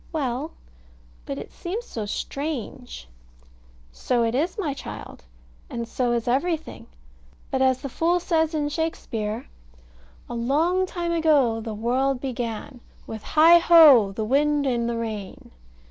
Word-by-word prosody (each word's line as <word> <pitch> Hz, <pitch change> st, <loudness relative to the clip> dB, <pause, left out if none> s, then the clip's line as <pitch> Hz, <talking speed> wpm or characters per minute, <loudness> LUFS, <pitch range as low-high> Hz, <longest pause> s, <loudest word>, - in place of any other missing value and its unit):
Well: 280 Hz, -1 st, -2 dB, 0.8 s
but 135 Hz, -, -4 dB
it 140 Hz, -, -8 dB
seems 405 Hz, +7 st, -5 dB
so 215 Hz, -3 st, -5 dB
strange. 260 Hz, -, -5 dB, 0.8 s
So 235 Hz, -, 0 dB
it 230 Hz, 0 st, 0 dB
is, 320 Hz, -, -1 dB
my 320 Hz, -9 st, -1 dB
child; 270 Hz, -, -9 dB, 0.4 s
and 235 Hz, -1 st, -4 dB
so 245 Hz, 0 st, -1 dB
is 235 Hz, 0 st, -2 dB
everything. 320 Hz, +6 st, -1 dB, 0.6 s
But, 265 Hz, -, 0 dB
as 260 Hz, -1 st, +2 dB
the -, -, -2 dB
fool 340 Hz, +6 st, +1 dB
says 320 Hz, -2 st, 0 dB
in 295 Hz, -1 st, 0 dB
Shakespeare 235 Hz, -8 st, -3 dB, 0.8 s
"A -, -, -7 dB
long 315 Hz, +11 st, +1 dB
time 345 Hz, -2 st, -3 dB
ago 290 Hz, -9 st, +2 dB
the 220 Hz, -1 st, -5 dB
world 255 Hz, +4 st, 0 dB
began, 245 Hz, -1 st, -5 dB, 0.3 s
With 220 Hz, -1 st, -7 dB
heigh 330 Hz, +6 st, +6 dB
ho, 305 Hz, -, +7 dB
the 215 Hz, +2 st, -3 dB
wind 290 Hz, +4 st, +2 dB
and 235 Hz, -3 st, 0 dB
the 235 Hz, -, -2 dB
rain." 215 Hz, -4 st, -6 dB
265 Hz, 140 wpm, -24 LUFS, 235-320 Hz, 0.8 s, ho